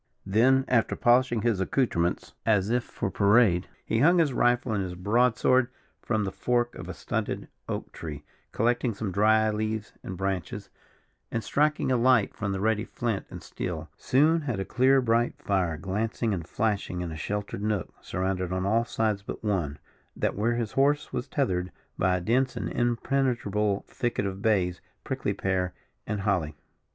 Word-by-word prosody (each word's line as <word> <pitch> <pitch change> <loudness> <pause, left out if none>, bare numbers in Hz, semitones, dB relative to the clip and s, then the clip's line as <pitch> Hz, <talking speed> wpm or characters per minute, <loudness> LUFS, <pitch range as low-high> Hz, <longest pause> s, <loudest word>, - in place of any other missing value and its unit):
Then, 130 +7 +4
after 120 -3 +2
polishing 120 -2 +3
his 115 -5 +2
accoutrements, 90 -6 0
as 105 -2 +2
if 120 0 +2
for 100 - -4
parade, 100 -3 +4 0.2
he 110 - 0
hung 170 +7 +5
his 155 -6 +3
rifle 120 -1 +2
and 100 -2 0
his 90 -1 -5
broad 115 +6 +2
sword 130 -1 +3 0.3
from 110 -3 0
the 95 - -2
fork 120 +2 0
of - - -8
a - - -4
stunted - - -3 0.2
oak - - -4
tree, 75 -3 -7 0.3
collecting 120 0 +1
some 100 -1 -3
dry 110 +3 +4
leaves 110 0 -3
and 95 - -6
branches, 95 -2 -3 0.6
and, 115 -1 -2
striking 150 -2 +1
a 125 - +3
light 120 -3 +3
from 100 -1 -3
the 95 - -2
ready 110 +1 +1
flint 115 -4 -3
and - - -9
steel, 80 -2 -5
soon 155 +5 +3
had 125 -9 -3
a 95 - -2
clear 130 +4 +4
bright 120 0 +1
fire 90 -5 0
glancing 105 +5 -1
and 85 -4 -4
flashing 105 -5 -1
in 85 -2 -4
a - - -5
sheltered 100 +5 -4
nook 105 -4 -1
surrounded 95 -1 -2
on 95 0 -1
all 115 +4 +2
sides 110 -3 0
but 100 - -7
one, 90 -9 -1 0.4
that - - -1
where 115 +4 +1
his 115 -3 -2
horse 145 +2 +1
was 125 +2 -3
tethered, 90 -11 -1 0.3
by 90 0 +3
a - - -4
dense 125 +8 +1
and - - -2
impenetrable 120 -5 0
thicket 120 -5 -2
of 95 0 -4
bays, 95 -5 +1 0.2
prickly - - -2
pear 95 -1 -1 0.3
and 105 -1 -2
holly. 90 -7 0
110 Hz, 175 wpm, -27 LUFS, 95-120 Hz, 0.6 s, hung